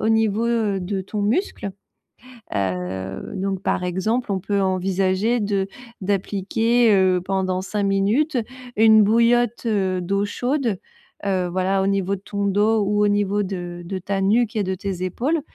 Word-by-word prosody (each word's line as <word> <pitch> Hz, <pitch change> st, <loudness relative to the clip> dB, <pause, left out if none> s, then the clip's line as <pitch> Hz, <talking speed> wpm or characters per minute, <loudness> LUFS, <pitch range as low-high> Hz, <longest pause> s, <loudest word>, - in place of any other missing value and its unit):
au 220 Hz, -, +1 dB
niveau, 220 Hz, 0 st, +2 dB
heu, 220 Hz, -4 st, +1 dB
de 190 Hz, +2 st, -2 dB
ton 205 Hz, +2 st, -4 dB
muscle, 215 Hz, -, -1 dB, 0.9 s
heu, 95 Hz, 0 st, -3 dB
donc 195 Hz, 0 st, -2 dB
par 180 Hz, -, 0 dB
exemple, 215 Hz, +6 st, -1 dB
on 190 Hz, -, -1 dB
peut 200 Hz, +2 st, 0 dB
envisager 190 Hz, +4 st, +1 dB
de 200 Hz, -2 st, 0 dB, 0.3 s
d'appliquer, 205 Hz, +4 st, +1 dB
heu, 185 Hz, -2 st, +3 dB
pendant 185 Hz, -1 st, -1 dB
5 205 Hz, +2 st, -2 dB
minutes 205 Hz, +10 st, +1 dB, 0.4 s
une 220 Hz, 0 st, +7 dB
bouillotte, 235 Hz, +2 st, +2 dB
heu, 190 Hz, -5 st, 0 dB
d'eau 200 Hz, +3 st, 0 dB
chaude, 245 Hz, -1 st, -1 dB, 0.5 s
heu, 185 Hz, -2 st, +1 dB
voilà. 190 Hz, +2 st, +1 dB
Au -, -, +1 dB
niveau 195 Hz, 0 st, 0 dB
de -, -, -18 dB
ton 200 Hz, 0 st, -3 dB
dos 210 Hz, +3 st, +2 dB
ou 205 Hz, +1 st, +2 dB
au -, -, +4 dB
niveau 205 Hz, 0 st, +1 dB
de 175 Hz, -2 st, -5 dB
de 190 Hz, +2 st, -4 dB
ta 195 Hz, +2 st, -2 dB
nuque 225 Hz, +4 st, +2 dB
et 210 Hz, -, +1 dB
de 190 Hz, 0 st, -2 dB
tes 185 Hz, -1 st, -4 dB
épaules 280 Hz, -, -1 dB
200 Hz, 160 wpm, -22 LUFS, 185-220 Hz, 0.9 s, une